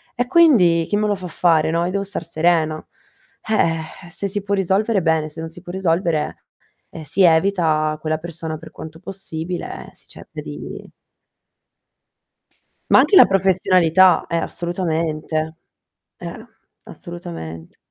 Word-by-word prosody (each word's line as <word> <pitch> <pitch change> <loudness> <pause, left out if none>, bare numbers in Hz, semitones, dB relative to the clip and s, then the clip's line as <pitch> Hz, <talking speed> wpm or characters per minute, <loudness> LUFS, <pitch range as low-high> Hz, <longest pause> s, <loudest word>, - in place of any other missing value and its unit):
e 245 - 0
quindi 245 - +5
chi 205 - 0
me 210 - +1
lo 210 - +1
fa 185 -2 -6
fare, 165 -3 +2
no, 170 +1 0
io 180 - -2
devo 200 +1 -1
star 200 -3 -5
serena. 160 -1 +1 0.6
Eh, 170 -4 -1
se 195 +2 -4
si 205 +1 -3
può 200 +1 -1
risolvere 195 +1 +1
bene, 160 -2 +1
se 160 +2 -12
non 165 - -5
si 175 +2 -13
può 175 -1 -9
risolvere, 170 -4 -1 0.4
ehm, 160 - -9
si 165 +7 -1
evita 160 -3 +3
quella 155 0 -1
persona 160 -1 -6
per 160 0 -13
quanto 160 0 -10
possibile, 180 -2 -6
si - - -19
cerca - - -10
di - - -8 2.0
Ma - - +8
anche 410 - +4
la - - +10
professionalità, 185 -2 +4
eh, 170 - -1
assolutamente. 160 -2 -2 0.6
Eh. - - -8 0.4
Assolutament 80 - -9
170 Hz, 140 wpm, -20 LUFS, 160-190 Hz, 2.0 s, la